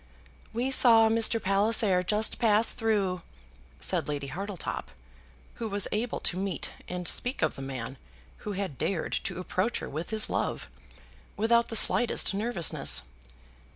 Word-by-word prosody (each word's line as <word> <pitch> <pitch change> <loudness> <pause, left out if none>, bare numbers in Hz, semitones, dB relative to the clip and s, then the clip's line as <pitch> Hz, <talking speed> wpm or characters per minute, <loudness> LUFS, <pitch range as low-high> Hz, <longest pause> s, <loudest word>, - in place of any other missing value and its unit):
"We 245 +4 -1
saw 225 -4 +6
Mr. 225 0 +3
Palliser 195 -1 +3
just 210 +4 0
pass 220 -1 +3
through," 200 -6 0 0.6
said - - -1
Lady 145 -2 -3
Hartletop, 190 - -5 0.7
who 225 - -2
was 200 -1 -1
able 220 +3 -1
to 180 - 0
meet 195 -5 -2 0.2
and 180 -1 -4
speak 245 +2 -1
of - - +2
the - - -7
man 130 -1 -6 0.4
who 210 - -5
had 190 -9 -4
dared 180 -5 -1
to - - -3
approach 185 +5 -1
her - - -5
with 155 +4 -5
his 220 -1 0
love, - - -2 0.7
without 235 +2 +3
the 225 - -3
slightest 235 -1 +2
nervousness. 205 - +1
205 Hz, 145 wpm, -28 LUFS, 180-225 Hz, 0.7 s, saw